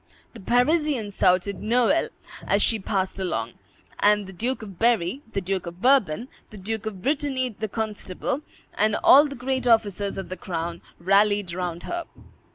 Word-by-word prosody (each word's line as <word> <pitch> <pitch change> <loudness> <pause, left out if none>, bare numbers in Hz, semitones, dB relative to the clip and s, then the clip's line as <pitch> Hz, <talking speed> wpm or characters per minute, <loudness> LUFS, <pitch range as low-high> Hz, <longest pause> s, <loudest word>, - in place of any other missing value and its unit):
The 235 - -11
Parisians 245 - +1
shouted 185 +1 +2
"Noel," 245 +7 +2 0.4
as 200 +1 +3
she 225 - +2
passed 190 -1 -2
along; 185 -2 -2 0.5
and 210 0 +4
the 190 - -10
Duke 235 +6 -2
of 195 -5 -10
Berry, 230 +1 +2
the 195 - -1
Duke 185 -1 -3
of 170 +1 -8
Bourbon, 245 - +3 0.2
the 215 - -12
Duke 220 +3 -4
of 190 -4 -6
Brittany, 275 -3 0
the 220 -1 -5
constable, 215 +3 -3 0.3
and 215 0 +1
all 290 +3 +8
the 280 - -7
great 255 0 -2
officers 205 -4 +2
of 195 - -6
the 185 - -5
crown 170 -1 -4 0.2
rallied 200 0 +2
round 175 -1 -4
her. 345 -1 -4
210 Hz, 165 wpm, -24 LUFS, 190-245 Hz, 0.5 s, all